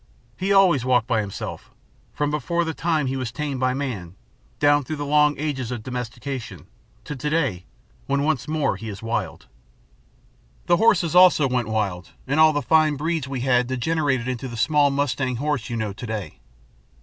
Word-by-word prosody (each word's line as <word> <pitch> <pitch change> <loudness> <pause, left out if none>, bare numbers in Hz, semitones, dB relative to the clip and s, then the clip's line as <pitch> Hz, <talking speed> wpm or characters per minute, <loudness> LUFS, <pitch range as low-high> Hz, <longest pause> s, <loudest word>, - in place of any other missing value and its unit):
He 190 +7 -2
always 185 -9 +5
walked 125 -3 +2
by 115 -3 +1
himself, 100 -2 -6 0.4
from 145 0 -1
before 170 +4 0
the 160 - -3
time 160 -2 0
he 130 +1 -2
was 130 -3 -3
tamed 145 -1 -4
by 130 0 +1
man, 105 -11 -4 0.4
down 145 0 +3
through 155 +4 -4
the 145 -1 -4
long 150 0 +3
ages 135 -5 -3
of 120 -4 -5
domestication, 125 +1 -6 0.4
to 150 - -6
to 150 +3 -3
day 140 - -1 0.4
when 140 +1 +1
once 155 -4 0
more 155 -1 0
he 110 - -7
is 100 +1 -8
wild. 105 -6 -3 1.2
"The 175 - +3
horses 185 -6 +3
also 180 -5 +6
went 125 -3 -1
wild, 100 -5 -2
and 145 +4 0
all 155 0 +7
the 145 -1 -2
fine 155 -2 +3
breeds 160 0 -2
we 135 -2 -4
had 125 -1 +2
degenerated 130 -1 0
into 130 +1 -3
the 120 -2 -7
small 145 +3 +3
mustang 135 -2 -1
horse 140 -2 -2
you 120 - -3
know 110 -3 -2
to 115 +4 -8
day. 110 -3 -5
135 Hz, 185 wpm, -23 LUFS, 120-150 Hz, 1.2 s, all